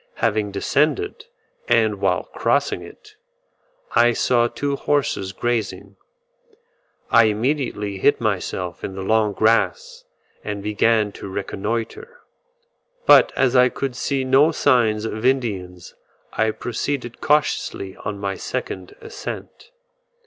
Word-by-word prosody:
Having 110 -2 0
descended, 155 - 0 0.4
and - - +2
while - - +1
crossing - - 0
it, 425 0 -14 0.8
I 120 0 +5
saw 120 0 +2
two 140 +3 -2
horses 140 -10 -1
grazing: 100 -3 -3 1.2
I 115 -1 +7
immediately 110 -3 -1
hid 145 - +3
myself 95 -4 -3
in 95 - -5
the 95 - -5
long 110 +1 +2
grass, 485 - +1 0.4
and 105 -1 -5
began 105 0 +2
to 100 - -9
reconnoitre; 115 - -4 0.9
but - - +7
as 130 -1 +2
I 125 0 +6
could 135 -1 -4
see 135 +1 -1
no 135 +5 +4
signs 115 -8 +2
of 110 0 -4
Indians 100 -9 -1 0.4
I 110 - +1
proceeded 120 +2 -4
cautiously 145 -9 0
on 105 0 -5
my 100 -1 -2
second 95 -1 -5
ascent. 455 - -8
115 Hz, 115 wpm, -21 LUFS, 100-135 Hz, 1.2 s, I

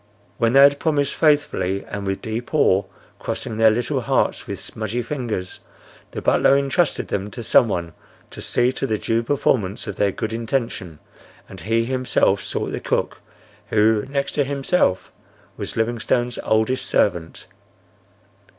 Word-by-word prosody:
When 115 0 +2
they 135 +1 +8
had 140 0 +5
promised 145 -3 0
faithfully 145 - +1
and 100 -1 -6
with 95 0 -3
deep 115 +6 -4
awe, 100 -9 +3 0.3
crossing 110 - -4
their 110 0 +6
little 115 +2 -1
hearts - - 0
with - - -4
smudgy 110 +3 -4
fingers, 115 -8 -4 0.5
the - - -7
butler 140 - +4
entrusted 140 +4 0
them 100 +1 -2
to 120 +3 -7
some 120 - +5
one 85 -5 -3 0.4
to - - -9
see 125 +1 +1
to 135 +1 -3
the 110 - 0
due 115 +2 0
performance 115 -5 0
of - - -6
their 100 -1 +2
good 110 +3 -4
intention, 115 - -3 0.5
and 95 - -11
he 115 +6 0
himself 130 0 +1
sought - - -3
the - - -3
cook, - - -2 0.5
who, 110 0 +3
next 140 0 -1
to 145 - +1
himself, 140 - 0 0.4
was - - -6
Livingstone's 120 +1 0
oldest 110 +4 +1
servant. 85 -5 0
115 Hz, 150 wpm, -22 LUFS, 105-135 Hz, 0.5 s, they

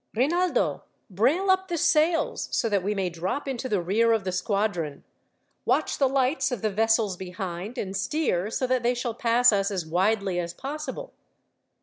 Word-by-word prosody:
"Rinaldo, 340 +9 +1 0.3
brail 285 - +2
up 375 0 +1
the 345 -2 -2
sails, 330 0 +2
so - - +1
that 200 -2 +1
we 205 +3 -1
may 190 -3 -1
drop 185 +13 -3
into 260 -1 -3
the 205 - +1
rear 225 +6 +3
of 220 -3 0
the 185 - -2
squadron. 190 -7 -1 0.6
Watch - - 0
the 270 -2 +4
lights 265 +1 +1
of 240 -5 -4
the 215 - +1
vessels 225 -1 +2
behind, 185 +4 -6
and 195 -3 -4
steer 200 - 0
so 255 - -1
that 255 0 +1
they 240 +1 +1
shall 240 -1 -3
pass 240 +1 +4
us 195 -1 +1
as 185 -5 -3
widely 190 +2 +1
as 170 -1 -4
possible." 305 - -6
225 Hz, 180 wpm, -26 LUFS, 190-265 Hz, 0.6 s, the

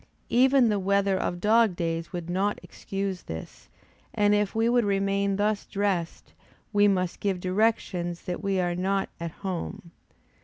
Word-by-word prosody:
Even 260 0 +5
the 205 -1 +1
weather 200 0 +2
of 175 -1 -2
dog 220 -1 +4
days 165 -1 -3
would 175 -3 -5
not 195 +4 0
excuse 195 -2 -4
this; 80 0 -9 0.5
and 205 0 +3
if 210 0 +1
we 225 +1 +2
would 240 0 +3
remain 200 0 +1
thus 210 +1 0
dressed, 195 -4 -2 0.4
we 205 0 +5
must 185 -3 0
give 195 -3 -1
directions 185 -3 0
that 180 - -4
we 195 -2 0
are 175 -1 0
not 190 +2 -1
at 170 0 -3 0.2
home. 175 -2 -4
195 Hz, 155 wpm, -27 LUFS, 180-205 Hz, 0.5 s, Even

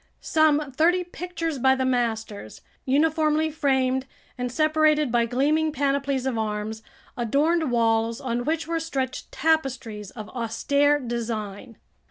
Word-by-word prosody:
Some 300 -2 +2
thirty 345 +7 +2
pictures 335 -4 -4
by 265 +1 +4
the 260 0 -1
masters, 225 - -2 0.2
uniformly 310 +2 +2
framed 265 -3 +1 0.3
and 250 -1 -3
separated 310 -1 +2
by 235 -1 +2
gleaming 300 +6 +1
panoplies 275 -2 0
of 250 -4 -1
arms, 215 0 -3 0.3
adorned 295 +7 +1
walls 225 -1 +1
on 240 -1 -2
which 315 +2 -1
were 335 0 -1
stretched 265 -5 -4
tapestries 260 -10 -1
of 215 -1 -9
austere 280 +5 +1
design. 230 -3 -5
265 Hz, 125 wpm, -25 LUFS, 235-310 Hz, 0.3 s, by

